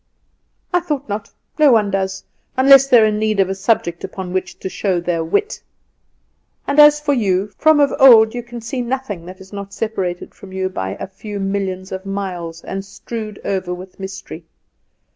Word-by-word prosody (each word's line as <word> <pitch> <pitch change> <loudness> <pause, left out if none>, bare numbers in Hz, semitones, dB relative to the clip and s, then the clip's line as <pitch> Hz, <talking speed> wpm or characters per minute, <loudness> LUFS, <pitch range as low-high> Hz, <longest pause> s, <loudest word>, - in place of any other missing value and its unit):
"I 355 - +4
thought 295 -5 -4
not. 205 0 -4 0.3
No 300 -3 +6
one 210 -4 +3
does, 190 0 -2 0.3
unless 275 +1 +7
they 250 -3 +6
are 220 - +5
in 210 -1 0
need 215 -1 0
of 190 -1 +3
a - - 0
subject 195 -4 0
upon 185 -2 -6
which 185 - -3
to - - -6
show 190 -1 -1
their 170 -1 -1
wit. 415 - -1 1.0
And 285 +1 +1
as 295 0 +8
for 295 -1 0
you, 200 -5 +1
from 315 -1 +4
of 285 -1 +3
old 225 -5 +8
you 245 - -3
can 240 0 -9
see 250 +3 -4
nothing 235 -8 -4
that 185 +1 -10
is 190 +1 -14
not 200 0 -7
separated 190 -6 -3
from 190 -1 -13
you 190 0 -1
by 95 - -4
a - - -6
few 200 +2 -8
millions 195 -1 -3
of 190 +1 -6
miles, 180 -4 -5
and 195 0 -5
strewed 215 +2 -7
over 185 -2 -2
with 185 +2 -12
mystery. 190 -3 -8
200 Hz, 190 wpm, -19 LUFS, 190-240 Hz, 1.0 s, as